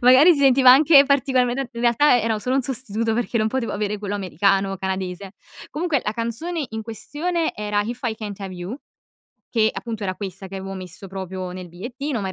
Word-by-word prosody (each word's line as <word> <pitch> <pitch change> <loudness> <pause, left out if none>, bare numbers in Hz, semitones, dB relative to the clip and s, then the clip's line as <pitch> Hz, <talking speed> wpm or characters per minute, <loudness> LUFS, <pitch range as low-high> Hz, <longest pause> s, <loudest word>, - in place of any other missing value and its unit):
magari 260 +7 +7
si 310 - -1
sentiva 265 -2 +6
anche 280 +2 +8
particolarmente 265 -2 +1
in 235 - -6
realtà, 245 +2 +4
era 225 -1 0
solo 250 +5 -1
un 275 - +2
sostituto, 230 -3 -2
perché 240 0 -1
non 215 -1 +2
potevo 255 0 -2
avere 210 0 -2
quello 205 0 -4
americano 195 +1 +1
o - - -4
canadese. 190 0 -4 0.4
Comunque, 310 -3 0
la 210 - -1
canzone 235 +9 -3
in 220 0 -5
questione 305 - -2
era: 210 0 -1
"If 235 +4 -4
I 230 -2 0
Can't 210 -3 -7
Have 195 -2 -6
You" 180 +9 -6 0.7
che 220 -2 +3
appunto, 225 -3 -6
era 185 -1 -2
questa 195 0 -7
che 195 - -7
avevo 195 0 -6
messo 185 +1 -9
proprio 185 -1 -5
nel 180 -1 -8
bigliettino, 245 - -5
ma, 195 - -3
in - - -4
220 Hz, 205 wpm, -22 LUFS, 195-260 Hz, 0.7 s, anche